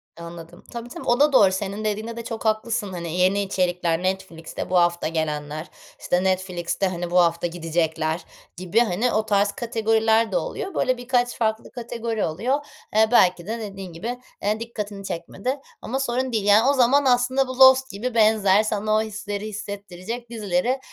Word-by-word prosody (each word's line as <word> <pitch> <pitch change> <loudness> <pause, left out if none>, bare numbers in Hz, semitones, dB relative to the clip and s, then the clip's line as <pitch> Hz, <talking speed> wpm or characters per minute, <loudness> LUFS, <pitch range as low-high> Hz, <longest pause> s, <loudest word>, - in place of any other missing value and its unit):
Anladım. 170 0 -10
Tabii, 235 0 -7
tabii. - - -8
O 240 +2 +2
da 295 -1 +4
doğru, 195 -7 +6
senin 200 +2 -3
dediğinde 215 +2 -2
de 235 - -5
çok 225 -1 -6
haklısın. 215 -2 0
Hani, 170 -2 -5
yeni 185 +2 +3
içerikler, 180 -3 0
Netflix'te 185 -4 -4
bu 185 - +2
hafta 175 -1 +2
gelenler, 155 -1 -3 0.3
işte, 180 +1 0
Netflix'te, 185 0 -1
hani, 175 -1 -4
bu 180 - +4
hafta 170 0 +2
gidecekler 160 -1 -1 0.3
gibi, 185 +5 +1
hani, 235 +1 +1
o 215 0 +1
tarz 205 -1 +2
kategoriler 225 -1 +1
de - - +1
oluyor. 390 - -4
Böyle, 255 -1 +1
birkaç 245 0 0
farklı 220 -1 -1
kategori 230 -2 -3
oluyor. 230 - 0 0.4
Eee, 220 0 +5
belki 180 -5 +4
de 230 +1 -3
dediğin 195 -4 -7
gibi, 235 +9 -5 0.2
eee, 210 +2 0
dikkatini 210 -4 -6
çekmedi 200 +12 -4 0.2
ama 265 +3 -3
sorun 255 0 -1
değil. 215 -3 -1
Yani, 215 +6 +5
o - - +4
zaman 270 +2 +4
aslında 255 +1 +3
bu 255 0 -6
Lost 265 0 +7
gibi 225 +5 -4
benzer, 215 -2 +4
sana 215 0 0
o - - +3
hisleri 210 -1 -5
hissettirecek 205 +2 -7
dizileri, 220 +2 -1
210 Hz, 170 wpm, -23 LUFS, 180-235 Hz, 0.4 s, Lost